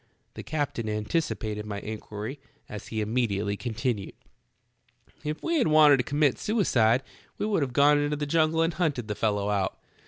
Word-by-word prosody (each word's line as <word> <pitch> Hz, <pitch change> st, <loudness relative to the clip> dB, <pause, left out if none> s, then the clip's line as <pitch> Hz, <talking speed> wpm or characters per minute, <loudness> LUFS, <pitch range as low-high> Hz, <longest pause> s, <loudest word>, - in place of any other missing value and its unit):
The -, -, -7 dB
captain 145 Hz, -7 st, -3 dB
anticipated 105 Hz, -1 st, -2 dB
my 105 Hz, -1 st, -5 dB
inquiry, 110 Hz, +5 st, -6 dB, 0.3 s
as 105 Hz, -, -8 dB
he 110 Hz, -1 st, -2 dB
imme 120 Hz, +2 st, +1 dB
diately 100 Hz, 0 st, -2 dB
continued. 115 Hz, -3 st, -3 dB, 1.1 s
"If 150 Hz, +1 st, -4 dB
we 335 Hz, -1 st, +1 dB
had 250 Hz, -, +3 dB
wanted 155 Hz, -2 st, +7 dB
to 125 Hz, -, 0 dB
commit 145 Hz, 0 st, +1 dB
suicide 130 Hz, -, +2 dB, 0.3 s
we -, -, -1 dB
would 210 Hz, -6 st, +1 dB
have 135 Hz, -3 st, -1 dB
gone 145 Hz, +3 st, +5 dB
into 145 Hz, +1 st, 0 dB
the 150 Hz, 0 st, -3 dB
jungle 160 Hz, +1 st, +2 dB
and 165 Hz, +1 st, 0 dB
hunted 145 Hz, -10 st, -1 dB
the 105 Hz, -, -2 dB
fellow 105 Hz, -1 st, 0 dB
out. 95 Hz, -3 st, -1 dB
125 Hz, 175 wpm, -27 LUFS, 105-155 Hz, 1.1 s, wanted